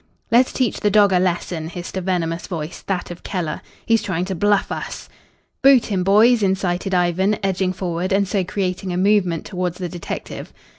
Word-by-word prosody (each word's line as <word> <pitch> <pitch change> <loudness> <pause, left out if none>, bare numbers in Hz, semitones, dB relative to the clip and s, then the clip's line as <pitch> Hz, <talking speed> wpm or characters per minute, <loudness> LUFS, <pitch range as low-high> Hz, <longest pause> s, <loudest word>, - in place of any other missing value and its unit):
"Let's 245 +2 +4
teach 255 -5 -1
the 210 - +2
dog 205 -1 +5
a 180 - +4
lesson," 175 -2 -1
hissed 175 +1 -7
a 190 - -1
venomous 170 -2 -2
voice 160 -1 -5
that 185 -2 -2
of 175 - -9
Keller. 170 -6 -3 0.2
"He's 225 -1 +3
trying 180 -2 -2
to 190 - -3
bluff 205 +3 +1
us." - - -5 0.5
"Boot 265 -4 +5
him, 185 -2 +1
boys," 220 +5 +5
incited 190 -1 0
Ivan, 180 +4 +2
edging 190 -1 0
forward 180 -1 -3
and 195 0 +2
so 195 -1 0
creating 185 0 -3
a 175 - -2
movement 185 -4 +2
towards 180 -3 -3
the 180 - -3
detective. 175 -1 -6
185 Hz, 185 wpm, -21 LUFS, 175-200 Hz, 0.5 s, dog